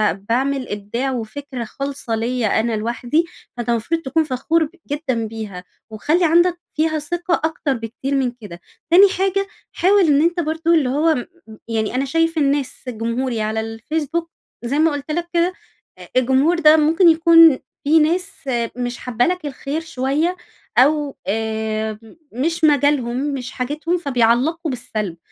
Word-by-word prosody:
ب 195 Hz, +1 st, -19 dB
باعمل 265 Hz, +2 st, 0 dB
إبداع 210 Hz, +6 st, -3 dB
وفكرة 250 Hz, +2 st, -5 dB
خالصة 275 Hz, 0 st, -4 dB
ليّا 230 Hz, -1 st, 0 dB
أنا 230 Hz, +1 st, 0 dB
لوحدي. 240 Hz, +8 st, 0 dB, 0.3 s
فأنتَ 240 Hz, 0 st, -4 dB
المفروض 235 Hz, +9 st, 0 dB
تكون 315 Hz, +3 st, +1 dB
فخور 305 Hz, +4 st, 0 dB
ب 305 Hz, -, -4 dB, 0.2 s
جدًا 260 Hz, -7 st, -1 dB
بيها. 210 Hz, -5 st, -7 dB, 0.3 s
وخلِّ 300 Hz, -, 0 dB
عندك 345 Hz, +2 st, +3 dB
فيها 315 Hz, 0 st, 0 dB
ثقة 345 Hz, +4 st, -2 dB
أكتر 320 Hz, -3 st, -1 dB
بكتير 240 Hz, +4 st, -4 dB
من 260 Hz, -3 st, +1 dB
كده. 205 Hz, -8 st, -12 dB, 0.3 s
تاني 380 Hz, +4 st, +7 dB
حاجة، 390 Hz, +1 st, 0 dB, 0.3 s
حاول 395 Hz, +3 st, +3 dB
إن 290 Hz, -1 st, +4 dB
أنتَ 345 Hz, +2 st, +1 dB
برضو 325 Hz, +1 st, 0 dB
اللي 295 Hz, -6 st, +3 dB
هو 310 Hz, +4 st, +2 dB
م 245 Hz, -, -4 dB, 0.3 s
م 215 Hz, -, -12 dB
يعني 225 Hz, 0 st, -2 dB
أنا 265 Hz, +2 st, 0 dB
شايف 330 Hz, +3 st, 0 dB
الناس 280 Hz, -2 st, 0 dB
جمهوري 230 Hz, +1 st, -2 dB
على 215 Hz, +1 st, -1 dB
الفيسبوك- 300 Hz, +9 st, -3 dB, 0.3 s
زي 275 Hz, +5 st, 0 dB
ما 320 Hz, +1 st, +4 dB
قلت 290 Hz, +1 st, -5 dB
لك- 345 Hz, +2 st, -2 dB
كده 345 Hz, +1 st, +2 dB, 0.4 s
آآ -, -, -12 dB
الجمهور 265 Hz, +7 st, +3 dB
ده 305 Hz, -1 st, +7 dB
ممكن 325 Hz, +4 st, +5 dB
يكون 330 Hz, -2 st, +6 dB, 0.2 s
في 315 Hz, +3 st, +4 dB
ناس 360 Hz, +5 st, +1 dB, 0.5 s
مش 245 Hz, -1 st, -3 dB
حابة 245 Hz, -1 st, 0 dB
لك 360 Hz, -2 st, -1 dB
الخير 290 Hz, +2 st, -4 dB
شوية 315 Hz, +2 st, -1 dB, 0.4 s
أو 290 Hz, +1 st, +3 dB
آآ 220 Hz, 0 st, -2 dB, 0.3 s
مش 330 Hz, +7 st, -2 dB
مجالهم، 285 Hz, -5 st, +3 dB, 0.2 s
مش 255 Hz, -2 st, -5 dB
حاجتهم، 300 Hz, +7 st, -2 dB
فبيعلقوا 280 Hz, +3 st, +1 dB
بالسلب. 215 Hz, -7 st, -4 dB
280 Hz, 155 wpm, -20 LUFS, 235-325 Hz, 0.5 s, تاني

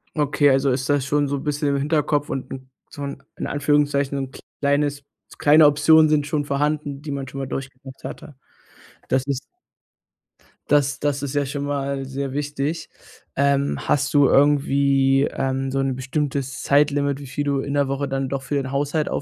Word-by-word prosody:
Okay, 145 Hz, -1 st, +3 dB
also 135 Hz, 0 st, +3 dB
ist 130 Hz, +1 st, -2 dB
das 145 Hz, -2 st, +2 dB
schon 145 Hz, 0 st, +1 dB
so 140 Hz, 0 st, -2 dB
bisschen 145 Hz, 0 st, -1 dB
im 140 Hz, -, +1 dB
Hinterkopf 145 Hz, 0 st, 0 dB
und 130 Hz, -1 st, -4 dB
'n 130 Hz, -1 st, -9 dB, 0.2 s
so 145 Hz, -, -8 dB
in 140 Hz, -1 st, -6 dB, 0.2 s
in -, -, -4 dB
Anführungszeichen 145 Hz, -1 st, +1 dB
so 135 Hz, -, -1 dB
'n 130 Hz, -, -8 dB, 0.3 s
kleines 145 Hz, 0 st, 0 dB, 0.3 s
kleine 150 Hz, +1 st, +6 dB
Optionen 155 Hz, +2 st, +5 dB
sind 150 Hz, -1 st, +2 dB
schon 150 Hz, 0 st, -1 dB
vorhanden, 145 Hz, 0 st, -1 dB
die 150 Hz, -, -5 dB
man 140 Hz, -1 st, -4 dB
schon 135 Hz, -, -9 dB
mal 135 Hz, -, -3 dB
durchgemacht 135 Hz, 0 st, -8 dB
hatte. 145 Hz, -, -8 dB, 0.7 s
Das 130 Hz, 0 st, +1 dB
ist 135 Hz, -2 st, -1 dB, 1.3 s
das 145 Hz, -1 st, +2 dB
das 145 Hz, -1 st, -1 dB
ist 135 Hz, -, -3 dB
ja 145 Hz, -, +1 dB
schon 140 Hz, +1 st, -4 dB
mal 140 Hz, -1 st, -2 dB
sehr 135 Hz, 0 st, -4 dB
wichtig, 145 Hz, +2 st, -3 dB, 0.5 s
ähm 140 Hz, 0 st, +1 dB
hast 145 Hz, -1 st, +1 dB
du 145 Hz, -2 st, +6 dB
irgendwie, 140 Hz, -1 st, +3 dB
ähm, 135 Hz, 0 st, -2 dB
so 135 Hz, -, -1 dB
'n 135 Hz, -1 st, 0 dB
bestimmtes 135 Hz, +1 st, -3 dB
Zeitlimit, 140 Hz, -1 st, +2 dB
wie 145 Hz, -, -9 dB
viel 145 Hz, +3 st, -3 dB
du 140 Hz, -1 st, 0 dB
in 140 Hz, +1 st, -4 dB
der 140 Hz, -1 st, +2 dB
Woche 140 Hz, +1 st, -2 dB
dann 135 Hz, -1 st, -2 dB
doch 135 Hz, -1 st, -3 dB
für 145 Hz, +2 st, -3 dB
den 130 Hz, -2 st, -2 dB
Haushalt, 145 Hz, +2 st, 0 dB
140 Hz, 185 wpm, -22 LUFS, 135-145 Hz, 1.3 s, kleine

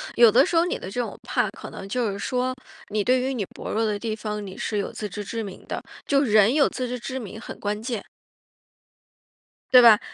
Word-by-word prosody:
有 235 Hz, -2 st, +7 dB
的 -, -, +6 dB
时 355 Hz, -, -2 dB
候 330 Hz, -, +5 dB
你 360 Hz, -, -1 dB
的 190 Hz, -, -8 dB
这 245 Hz, -, -1 dB
种 240 Hz, -, -5 dB
怕， -, -, 0 dB
可 -, -, -10 dB
能 195 Hz, -, -8 dB
就 240 Hz, -2 st, 0 dB
是 200 Hz, -, -6 dB
说， 255 Hz, +3 st, -1 dB, 0.4 s
你 210 Hz, 0 st, 0 dB
对 255 Hz, +4 st, +3 dB
于 260 Hz, +2 st, -1 dB
你 235 Hz, -5 st, -1 dB
薄 -, -, -6 dB
弱 225 Hz, -, +1 dB
的 210 Hz, -2 st, 0 dB
地 220 Hz, +1 st, -3 dB
方， 210 Hz, -1 st, -4 dB
你 190 Hz, -, -8 dB
是 210 Hz, -, -2 dB
有 200 Hz, -, -2 dB
自 210 Hz, -, -5 dB
知 205 Hz, +2 st, -5 dB
之 225 Hz, +3 st, -4 dB
明 195 Hz, -3 st, -9 dB
的。 -, -, -3 dB, 0.2 s
就 275 Hz, -1 st, +3 dB
人 215 Hz, -3 st, +5 dB
有 290 Hz, -1 st, +4 dB
自 255 Hz, -1 st, -3 dB
知 250 Hz, +1 st, -4 dB
之 260 Hz, +2 st, -5 dB
明 220 Hz, -2 st, -7 dB
很 -, -, -8 dB
关 210 Hz, +1 st, -2 dB
键。 230 Hz, -3 st, -3 dB, 1.7 s
对 250 Hz, -, +10 dB
吧 225 Hz, -3 st, +8 dB
225 Hz, 255 characters per minute, -25 LUFS, 210-250 Hz, 1.7 s, 对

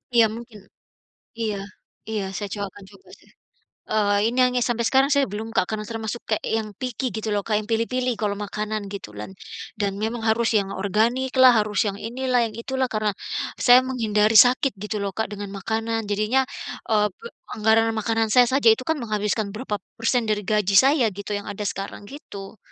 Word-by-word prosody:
Iya, 230 Hz, -1 st, +7 dB
mungkin 230 Hz, -3 st, -10 dB, 0.8 s
Iya, 215 Hz, -3 st, -2 dB, 0.5 s
iya, 215 Hz, -3 st, -2 dB
saya 205 Hz, -2 st, -4 dB
cowa 205 Hz, -1 st, -3 dB
akan 200 Hz, -, -13 dB
coba 390 Hz, -, -19 dB
seh. -, -, -23 dB, 0.6 s
Eee, 205 Hz, -1 st, +2 dB
ini 245 Hz, +2 st, -3 dB
hanya 250 Hz, 0 st, +1 dB
sampai 235 Hz, -1 st, 0 dB
sekarang 270 Hz, +1 st, +4 dB
saya 280 Hz, -1 st, +4 dB
belum, 220 Hz, +2 st, -4 dB
Kak, -, -, +4 dB
karena 215 Hz, 0 st, -3 dB
termasuk 225 Hz, 0 st, -4 dB
kayak 215 Hz, -, -1 dB
yang 220 Hz, -1 st, -2 dB
picky 255 Hz, 0 st, -3 dB
gitu 220 Hz, 0 st, -4 dB
loh, 205 Hz, -, +1 dB
Kak, 220 Hz, -, 0 dB
yang 215 Hz, -, -5 dB
pilih-pilih 250 Hz, +3 st, 0 dB
kalau 205 Hz, -1 st, -1 dB
makanan 215 Hz, +1 st, -3 dB
gitu 200 Hz, -, -6 dB
lan 105 Hz, -, -6 dB, 0.5 s
dan 200 Hz, -1 st, +1 dB
memang 225 Hz, +2 st, -2 dB
harus 225 Hz, +1 st, +2 dB
yang 195 Hz, -1 st, -2 dB
organiklah, 250 Hz, +6 st, +4 dB
harus 210 Hz, -1 st, -1 dB
yang 200 Hz, -, -4 dB
inilah, 255 Hz, +1 st, 0 dB
yang -, -, -15 dB
itulah 260 Hz, +1 st, -1 dB
karena 215 Hz, -1 st, +1 dB, 0.6 s
saya 245 Hz, 0 st, +9 dB
menghindari 220 Hz, -3 st, +2 dB
sakit 255 Hz, +3 st, +6 dB
gitu 210 Hz, 0 st, -3 dB
loh, 200 Hz, -1 st, -2 dB
Kak, 220 Hz, -2 st, -2 dB
dengan 205 Hz, -1 st, -6 dB
makanan. 225 Hz, +2 st, -1 dB
Jadinya, 215 Hz, +6 st, +2 dB, 0.5 s
eee, 210 Hz, -1 st, +4 dB
pe 460 Hz, -, -12 dB, 0.3 s
anggaran 220 Hz, +1 st, +3 dB
makanan 225 Hz, +1 st, 0 dB
saya 250 Hz, -1 st, +8 dB
saja 265 Hz, -4 st, +4 dB
itu 255 Hz, -, -9 dB
kan 320 Hz, -, +2 dB
menghabiskan 210 Hz, -2 st, -1 dB
berapa 215 Hz, -2 st, -3 dB, 0.2 s
persen 230 Hz, +2 st, +1 dB
dari 210 Hz, -1 st, 0 dB
gaji 205 Hz, -1 st, +1 dB
saya 270 Hz, +4 st, +5 dB
gitu 200 Hz, -, -7 dB
yang 205 Hz, -, -10 dB
ada 205 Hz, +1 st, -5 dB
sekarang, 195 Hz, +1 st, -5 dB
gitu. 205 Hz, -9 st, -10 dB
220 Hz, 185 wpm, -23 LUFS, 210-245 Hz, 0.8 s, saya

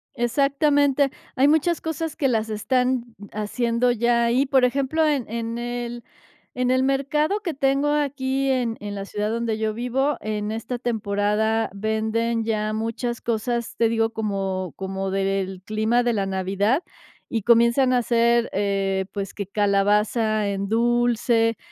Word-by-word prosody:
Exactamente. 280 Hz, +2 st, +2 dB, 0.2 s
Hay 270 Hz, +2 st, +4 dB
muchas 315 Hz, +3 st, +2 dB
cosas 320 Hz, 0 st, -3 dB
que 275 Hz, -, +1 dB
las 225 Hz, -3 st, 0 dB
están 250 Hz, +3 st, 0 dB, 0.3 s
haciendo 235 Hz, +3 st, 0 dB
ya 235 Hz, 0 st, +2 dB
ahí, 245 Hz, +4 st, +2 dB
por 265 Hz, -2 st, +3 dB
ejemplo, 275 Hz, +5 st, +1 dB
en 285 Hz, -5 st, 0 dB
en 230 Hz, +1 st, -3 dB
el 240 Hz, 0 st, -4 dB, 0.5 s
en 250 Hz, 0 st, +1 dB
el 260 Hz, 0 st, +3 dB
mercado 300 Hz, +8 st, +1 dB
que 345 Hz, -5 st, -3 dB
tengo 275 Hz, +1 st, +1 dB
aquí 275 Hz, -2 st, 0 dB
en 245 Hz, -3 st, 0 dB
en 205 Hz, 0 st, -6 dB
la 195 Hz, 0 st, -5 dB
ciudad 210 Hz, +1 st, -3 dB
donde 230 Hz, -1 st, -1 dB
yo 220 Hz, 0 st, -1 dB
vivo, 250 Hz, +5 st, 0 dB
en 210 Hz, 0 st, -3 dB
esta 225 Hz, +2 st, -4 dB
temporada 220 Hz, -1 st, 0 dB
venden 220 Hz, +2 st, -1 dB
ya 215 Hz, -1 st, -1 dB
muchas 230 Hz, +2 st, -3 dB
cosas, 235 Hz, +1 st, -2 dB
te 230 Hz, -, +3 dB
digo, 225 Hz, 0 st, +1 dB
como 195 Hz, -5 st, -3 dB
como 190 Hz, 0 st, -4 dB
del 195 Hz, -1 st, -1 dB
clima 220 Hz, +4 st, +1 dB
de 240 Hz, -1 st, +1 dB
la 200 Hz, -3 st, 0 dB
Navidad. 195 Hz, -, 0 dB, 0.5 s
Y 225 Hz, -4 st, -1 dB
comienzan 235 Hz, +2 st, +4 dB
a 250 Hz, -, +4 dB
hacer, 235 Hz, 0 st, +2 dB
eh, 195 Hz, -1 st, 0 dB
pues, 200 Hz, -2 st, -5 dB
que 200 Hz, -, -4 dB
calabaza 210 Hz, +2 st, +1 dB
en 200 Hz, 0 st, -2 dB
dulce, 235 Hz, 0 st, +2 dB
230 Hz, 150 wpm, -23 LUFS, 210-255 Hz, 0.5 s, Hay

